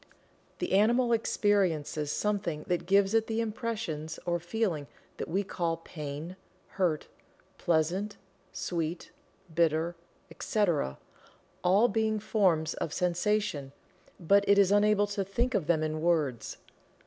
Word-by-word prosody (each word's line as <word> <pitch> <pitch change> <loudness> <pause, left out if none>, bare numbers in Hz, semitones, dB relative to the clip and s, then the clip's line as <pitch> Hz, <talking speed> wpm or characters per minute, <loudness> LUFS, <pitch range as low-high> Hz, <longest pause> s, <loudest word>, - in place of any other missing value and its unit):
The - - -3
animal 235 +5 +4
experiences 180 -9 +1
something 195 -7 -1
that 175 -1 -1
gives 195 +1 +4
it 225 0 +2
the 225 0 -1
impressions 210 -9 -3
or 175 -1 0
feeling 175 -4 -2 0.3
that - - -4
we 190 +5 0
call 170 -3 -2
"pain," 155 +1 -7 0.3
"hurt," 175 -6 0 0.5
"pleasant," 175 +5 0 0.3
"sweet," 170 -1 -3 0.4
"bitter," 165 +1 +1 0.4
etc., 170 - 0 0.7
all 195 +6 +5
being 220 -1 0
forms 185 -7 +1
of 155 - -4
sensation, 180 -5 0 0.5
but 200 +3 +4
it 200 - +6
is 200 -1 +5
unable 205 0 +4
to 205 -1 -2
think 235 +7 -1
of 180 -8 0
them 160 -2 +2
in 155 0 -2
words. 155 -8 0
180 Hz, 125 wpm, -29 LUFS, 160-210 Hz, 0.7 s, it